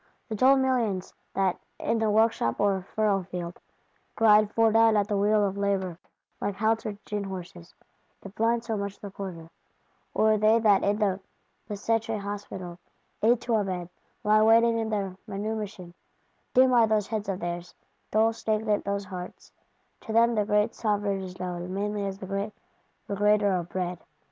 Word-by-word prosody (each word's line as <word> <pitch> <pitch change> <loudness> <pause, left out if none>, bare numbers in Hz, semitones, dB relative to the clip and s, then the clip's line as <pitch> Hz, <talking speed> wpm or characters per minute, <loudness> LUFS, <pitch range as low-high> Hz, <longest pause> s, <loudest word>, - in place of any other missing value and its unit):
The 220 - -2
dull 260 +5 +5
millions 240 -8 0 0.2
that, 190 -2 +1 0.2
in 225 0 0
the 220 -1 +1
workshop 220 - +2
or 200 -2 +2
furrowfield, 185 -5 -1 0.6
grind 215 -1 +5
fore 225 -1 +3
done 225 0 +5
at 205 -1 +1
the 210 - -1
wheel 205 +1 +3
of 200 0 -3
Labour, 190 -4 -1 0.4
like 205 - -2
haltered 220 0 0
gin 210 -1 -3
horses, 180 -2 -8 0.5
if 195 - -10
blind 230 +2 +1
so 225 -1 -2
much 200 -1 -4
the 200 - -8
quieter? 175 -4 -8 0.6
Or 215 0 +3
they 215 +2 +5
that 210 -4 +4
in 205 +1 +2
the 200 -3 +1 0.5
Bicêtre 225 +2 -1
Hospital, 200 -3 -6 0.4
"eight 230 +2 +3
to 240 - -2
a 215 -2 +3
bed," 180 -3 -4 0.3
lie 215 +1 +4
waiting 225 0 +4
their 195 -3 -2
manumission? 205 -3 -5 0.6
Dim 255 0 +6
are 235 -2 +5
those 215 -2 +1
heads 210 -1 -3
of 190 -1 -2
theirs, 175 0 -5 0.3
dull 220 +1 +3
stagnant 215 -1 0
those 200 0 -2
hearts: 180 -1 -9 0.5
to - - -8
them 235 +1 +4
the 210 -2 +1
great 210 0 +2
Sovereign 205 -3 -1
is 185 -1 -8
known 180 0 -4
mainly 205 0 -2
as 195 0 -5
the 195 - -8
great 200 +2 -3 0.5
Regrater 205 0 +2
of 175 0 -7
Bread. 180 -1 -3
205 Hz, 165 wpm, -27 LUFS, 190-220 Hz, 0.6 s, Dim